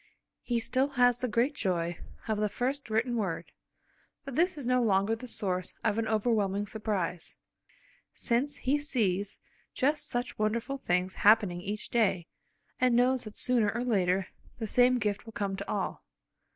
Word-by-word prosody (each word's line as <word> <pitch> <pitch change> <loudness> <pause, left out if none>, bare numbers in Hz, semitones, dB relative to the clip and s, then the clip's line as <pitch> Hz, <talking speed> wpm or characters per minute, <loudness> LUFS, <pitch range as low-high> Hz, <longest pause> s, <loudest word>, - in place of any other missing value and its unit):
He 240 -1 -1
still 260 +4 +1
has 245 -1 +4
the 255 - -1
great 240 +5 +1
joy 175 - -1 0.3
of 215 -2 0
the 210 0 +1
first 260 +4 -2
written 235 +3 0
word, 190 -7 -3 0.7
but 275 - -6
this 350 +2 +2
is 280 - -5
no 250 0 +3
longer 205 0 +2
the 250 +3 -9
source 185 -6 -2
of 215 0 +1
an 225 - -1
overwhelming 210 -2 +1
surprise, 205 -6 -3 0.7
since 275 +4 0
he 280 +3 +1
sees 205 - 0 0.4
just 295 +3 +1
such 245 -1 -3
wonderful 235 +5 -1
things 180 -3 0
happening 205 -4 +4
each 205 +3 -5
day, 195 -7 +2 0.5
and 250 -2 +3
knows 250 +1 +3
that 215 - -9
sooner 240 -5 +2
or 235 +4 -2
later 190 -5 +1 0.3
the 225 - -3
same 250 +3 +4
gift 210 -1 -2
will 225 - -9
come 200 -3 -2
to 200 +1 -7
all. 205 - -3
220 Hz, 165 wpm, -30 LUFS, 200-250 Hz, 0.7 s, has